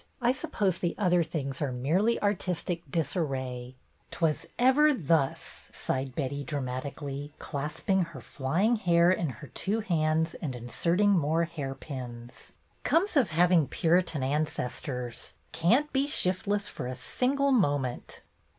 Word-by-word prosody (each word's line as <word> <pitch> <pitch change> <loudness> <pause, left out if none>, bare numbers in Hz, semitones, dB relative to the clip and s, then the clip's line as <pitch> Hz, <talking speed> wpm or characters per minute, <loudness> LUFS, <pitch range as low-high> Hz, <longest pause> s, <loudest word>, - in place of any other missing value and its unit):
I 245 -1 +3
suppose 195 -8 -1
the 175 - -1
other 180 -3 +3
things 140 -4 -4
are 145 -3 0
merely 165 - +1
artistic 180 -4 -1
disarray." 130 -6 -2 0.3
"'T - - -7
was 160 -3 +1
ever 280 +4 +5
thus 155 - -1
!" - - -31
sighed 130 -1 -2
Betty, 140 -1 -2
dramatic 140 0 -4
ally, 140 0 -4
clasping 155 +6 -1
her 165 -5 -10
flying 170 - 0
hair 170 -3 +4
in 175 -4 0
her 120 - -9
two 215 +4 -1
hands 160 -4 +1
and 140 -6 -3
inserting 170 - +1
more 165 -2 +2
hairpins. 135 -6 -7 0.3
"Comes 355 +3 +2
of 255 - +4
hav 170 +2 +3
ing 165 -6 +5
Puritan 170 -3 +1
ancestors. 130 -3 -3 0.2
Can't 225 - +2
be 275 +1 +2
shiftless 205 -4 -1
for 125 - -5
a 130 - -4
single 275 - +1
moment." 145 - 0
160 Hz, 140 wpm, -29 LUFS, 135-190 Hz, 0.3 s, ever